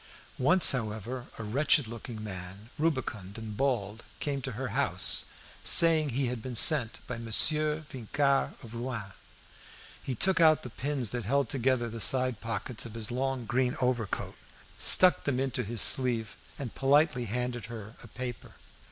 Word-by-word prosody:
Once, 180 +8 +5
however, 120 0 -4
a 115 - -6
wretched 140 +7 +2
looking 115 -1 -8
man, 95 +2 -8
rubicund 120 - -2
and 110 -2 -7
bald, 115 -4 -2 0.2
came 140 -2 -3
to 130 -1 -5
her 130 +3 -5
house, - - +3 0.4
saying 160 -3 +7
he 135 +2 -1
had 125 -2 -4
been 125 +1 -7
sent 120 -2 +5
by 120 -2 -6
Monsieur 150 +7 +2
Vincart 135 +2 -1
of 115 -1 -11
Rouen. 115 -5 -6 0.9
He 130 - -4
took 190 +6 +3
out 155 -1 +5
the 125 - -8
pins 135 -4 -3
that 120 -4 -4
held 140 +2 0
together 130 -2 0
the 115 0 -7
side 130 -2 0
pockets 115 +1 -4
of 115 -1 -9
his 115 0 -4
long 130 0 -2
green 125 +2 -1
overcoat, 125 -5 -2 0.4
stuck 185 -1 +5
them 130 -3 -1
into 130 -1 -1
his 110 0 +1
sleeve, 120 -5 +1 0.2
and 130 -5 -6
politely 140 -2 +2
handed 120 +1 -4
her 110 -2 -9
a - - -12
paper. 125 +1 -7
125 Hz, 160 wpm, -29 LUFS, 115-135 Hz, 0.9 s, saying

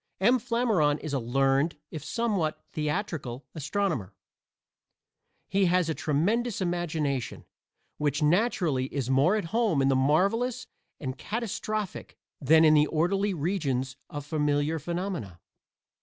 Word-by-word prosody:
M. 240 +7 +4
Flammarion 225 - +1
is 155 -2 -6
a 135 - +1
learned, 135 +5 +1
if 155 -3 -6
somewhat 200 -6 -1
theatrical, 150 - -3
astronomer. 150 - -2 1.3
He 195 0 +2
has 180 -1 +2
a - - +1
tremendous 200 +12 0
imagination, 160 -7 -2 0.5
which 150 0 0
naturally 165 - +2
is 135 -2 -3
more 140 +10 +4
at 210 - -1
home 220 -10 +2
in 135 0 +3
the 135 - +3
marvelous 200 - +1 0.3
and 130 -2 -5
catastrophic 215 -2 -4 0.2
than 160 +3 +5
in 155 - +6
the 150 0 +5
orderly 190 +6 +1
regions 140 -6 -1
of 145 -1 -6
familiar 150 +1 0
phenomena. 170 - -4
160 Hz, 125 wpm, -28 LUFS, 140-200 Hz, 1.3 s, in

